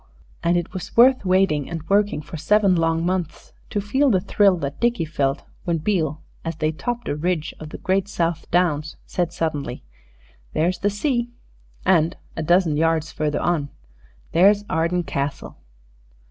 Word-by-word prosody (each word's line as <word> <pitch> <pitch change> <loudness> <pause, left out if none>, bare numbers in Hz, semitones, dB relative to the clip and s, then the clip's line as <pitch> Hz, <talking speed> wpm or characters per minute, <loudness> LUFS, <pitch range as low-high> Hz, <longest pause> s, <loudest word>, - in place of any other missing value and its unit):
And 170 +1 +2
it 175 - -3
was 185 +3 -7
worth 255 +1 +6
waiting 185 -6 +2
and 165 -2 -6
working 200 -6 +2
for 165 - -9
seven 200 +5 +3
long 165 -1 +1
months, 180 -3 -3 0.2
to 205 - -1
feel 265 +8 +2
the 195 -6 +3
thrill 195 0 +3
that 145 -3 -5
Dickie 235 -6 +1
felt 140 -3 -1 0.2
when 170 -3 0
Beale, 160 -3 -1 0.2
as 165 -1 -3
they 155 0 0
topped 240 +9 -4
a - - -1
ridge 165 0 -1
of 155 - -8
the - - -7
great 190 +1 0
South 170 -4 -2
Downs, 155 -4 +1
said 175 -2 -1
suddenly, 150 -7 -3 0.7
"There's 175 +3 +1
the 205 - +1
sea," 240 +3 -1 0.6
and, 170 -2 +3 0.2
a - - -3
dozen 170 -1 +3
yards 165 0 +1
further 150 -1 -1
on, 155 -5 0 0.6
"There's 200 +5 +5
Arden 170 +2 +1
Castle." 140 -2 -4
170 Hz, 160 wpm, -22 LUFS, 155-195 Hz, 0.7 s, worth